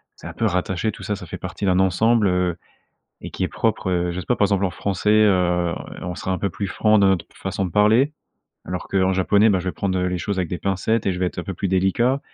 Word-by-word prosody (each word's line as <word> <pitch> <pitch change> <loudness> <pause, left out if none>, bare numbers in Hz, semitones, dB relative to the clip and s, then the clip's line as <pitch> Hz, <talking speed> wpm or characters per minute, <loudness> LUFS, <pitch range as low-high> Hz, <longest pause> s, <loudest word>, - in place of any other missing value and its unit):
c'est - - -11
un - - -7
peu 115 - -2
rattaché 95 +2 0
tout - - -12
ça, 105 - -2
ça 95 - -9
fait - - -7
partie 100 - -5
d'un 90 -1 +3
ensemble, 105 +4 +3
heu, 90 -1 +1 0.7
et - - -7
qui - - -5
est - - -1
propre, - - -1
heu, 90 -1 0
je 90 - -4
sais - - -10
pas, 125 - +1
par - - +3
exemple, 100 -1 +1
en 90 - -3
français, 100 +3 -1
heu, 90 -5 +3 0.3
on 90 -1 -4
sera 95 - -5
un 95 - 0
peu 100 - -1
plus 85 +5 -4
franc 110 +2 +3
dans 100 - +4
notre 95 -3 +1
façon 95 0 -3
de 90 - -3
parler, 110 +8 +4 0.5
alors 90 +1 -4
qu'en 95 -1 +2
japonais, 100 +3 +3
bah, 95 - +2
je 90 - -9
vais 90 - -1
prendre, 95 -2 -1
heu, 90 0 0
les 90 - -2
choses 95 +3 -3
avec 90 - -1
des 90 - -3
pincettes 100 +3 -1
et 95 - +2
je - - -5
vais - - +2
être 90 - -6
un - - -8
peu 95 - -5
plus 100 +3 -2
délicat 95 +9 +1
95 Hz, 275 wpm, -22 LUFS, 90-105 Hz, 0.7 s, dans